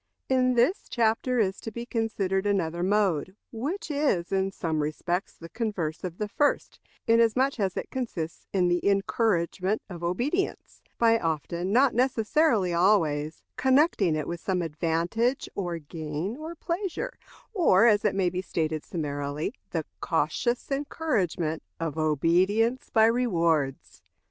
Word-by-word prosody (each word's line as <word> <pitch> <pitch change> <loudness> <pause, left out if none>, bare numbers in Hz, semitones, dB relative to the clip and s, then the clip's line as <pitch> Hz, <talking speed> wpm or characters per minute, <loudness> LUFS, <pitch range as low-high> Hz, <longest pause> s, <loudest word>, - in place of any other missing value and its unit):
In 255 -1 +3
this 250 - +2
chapter 235 +2 +1
is 195 -4 0
to 225 - -6
be 235 +2 -6
considered 205 -5 -1
another 175 -4 0
mode, 190 -3 +1 0.2
which 300 - -4
is 280 - 0
in 195 0 +1
some 160 -5 -2
respects 175 +5 -2
the 165 - -10
converse 175 -5 -3
of 180 -2 -5
the 210 - -2
first, 290 +7 0 0.3
inasmuch 230 +4 +3
as 190 -3 -1
it - - -4
consists 185 -11 -4
in 185 -2 +2
the 175 0 +1
encouragement 195 -1 0
of 170 -1 -7
obedience, 255 - -2 0.2
by 230 -1 +4
often 170 +2 -2
not 255 +4 +4
necessarily 240 - +2
always 160 -5 +2
connecting 260 - +3
with 170 0 -4
it - - -24
some 185 -2 0
advantage, 170 - 0
or 175 -4 -3
gain, 155 +5 -5
or 315 +4 -7
pleasure; 375 +9 -3 0.4
or, 275 - +5
as 210 -3 +4
it 210 - +1
may 185 -2 +1
be 180 +1 -2
stated 160 -4 -2
summarily, 145 - -3 0.2
the - - -2
cautious 240 +3 -1
encouragement 200 - -1 0.2
of 160 -2 -3
obedience 185 - +2
by 220 -1 +5
rewards. 170 - 0
195 Hz, 140 wpm, -27 LUFS, 170-240 Hz, 0.4 s, or